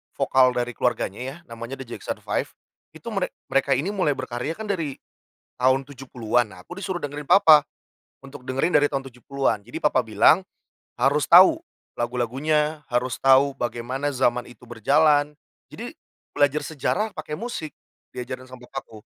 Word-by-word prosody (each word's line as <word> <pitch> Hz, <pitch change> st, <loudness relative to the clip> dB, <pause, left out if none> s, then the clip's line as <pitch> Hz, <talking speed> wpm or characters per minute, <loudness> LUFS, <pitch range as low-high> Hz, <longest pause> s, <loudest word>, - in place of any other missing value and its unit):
vokal 130 Hz, -1 st, +3 dB
dari 120 Hz, 0 st, -1 dB
keluarganya 120 Hz, -4 st, -1 dB
ya, 130 Hz, +3 st, -5 dB, 0.2 s
namanya 115 Hz, +3 st, -6 dB
The 135 Hz, -, -8 dB
Jackson 120 Hz, -, -6 dB
5, -, -, -6 dB
itu -, -, -13 dB
merek -, -, -2 dB, 0.2 s
mereka 135 Hz, 0 st, +2 dB
ini 155 Hz, +10 st, -1 dB
mulai 180 Hz, -8 st, 0 dB
berkarya 130 Hz, +4 st, -4 dB
kan 215 Hz, -1 st, -4 dB
dari 160 Hz, -8 st, -3 dB, 0.6 s
tahun 130 Hz, +1 st, +2 dB
70-an, 125 Hz, -4 st, -2 dB
nah 90 Hz, 0 st, -14 dB
aku 175 Hz, -, -8 dB
disuruh 185 Hz, -2 st, -3 dB
dengerin 145 Hz, -1 st, -5 dB
papa, 160 Hz, -2 st, +7 dB, 0.6 s
untuk 135 Hz, -2 st, -12 dB
dengerin 135 Hz, +7 st, 0 dB
dari 145 Hz, -, +3 dB
tahun 135 Hz, -2 st, -3 dB
70-an. 135 Hz, -1 st, -1 dB
Jadi 140 Hz, +7 st, -7 dB
papa 150 Hz, -3 st, +3 dB
bilang, 155 Hz, -, +4 dB, 0.5 s
"Harus 140 Hz, +3 st, +3 dB
tahu 190 Hz, -, +8 dB, 0.3 s
lagu-lagunya, 145 Hz, +6 st, -1 dB
harus 125 Hz, 0 st, 0 dB
tahu 135 Hz, +1 st, +4 dB
bagaimana 130 Hz, +4 st, -3 dB
zaman 125 Hz, -2 st, +1 dB
itu 120 Hz, 0 st, -16 dB
berjalan." 145 Hz, +5 st, +3 dB, 0.4 s
Jadi -, -, -8 dB, 0.4 s
belajar 145 Hz, +1 st, +3 dB
sejarah 165 Hz, +9 st, -1 dB
pakai 150 Hz, 0 st, -6 dB
musik 225 Hz, -10 st, -5 dB, 0.4 s
di 125 Hz, -, -6 dB
ajaran 130 Hz, +1 st, -6 dB
sama 125 Hz, -1 st, -13 dB
bokapku, 110 Hz, -1 st, -8 dB
135 Hz, 155 wpm, -24 LUFS, 125-150 Hz, 0.6 s, tahu